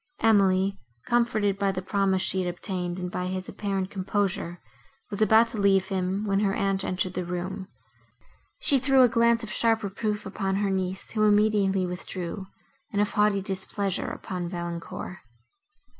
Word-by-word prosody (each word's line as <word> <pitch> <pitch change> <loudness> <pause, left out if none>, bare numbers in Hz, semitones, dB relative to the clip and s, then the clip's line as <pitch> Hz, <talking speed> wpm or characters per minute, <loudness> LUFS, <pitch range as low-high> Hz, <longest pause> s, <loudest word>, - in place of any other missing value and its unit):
Emily, 195 -3 +3 0.3
comforted 215 -4 +1
by 200 -1 +2
the 185 -1 -4
promise 190 -1 +1
she 190 - 0
had 180 - -1
obtained, 180 -1 -3
and 180 -1 -4
by 180 0 -2
his 185 0 -3
apparent 195 -2 -3
composure, 190 -3 -2 0.5
was 205 - -4
about 220 +2 +6
to 220 - -4
leave 195 -1 +3
him, 190 +1 -1
when 195 -1 +1
her 200 -2 +1
aunt 195 -1 0
entered 185 0 -2
the 180 - -2
room. 180 +2 -4 0.9
She 295 - +4
threw 265 0 +5
a - - +7
glance 235 0 +3
of 215 - -6
sharp 225 -1 +2
reproof 210 +1 -2
upon 195 -1 -2
her 200 0 0
niece, 190 0 -2
who 215 -1 +2
immediately 205 -2 +3
withdrew, 180 +1 -5 0.4
and 200 - -1
of 205 - +2
haughty 210 -2 +2
displeasure 195 0 -2
upon 180 -2 -5
Valancourt. 175 +1 -6
195 Hz, 160 wpm, -26 LUFS, 185-210 Hz, 0.9 s, a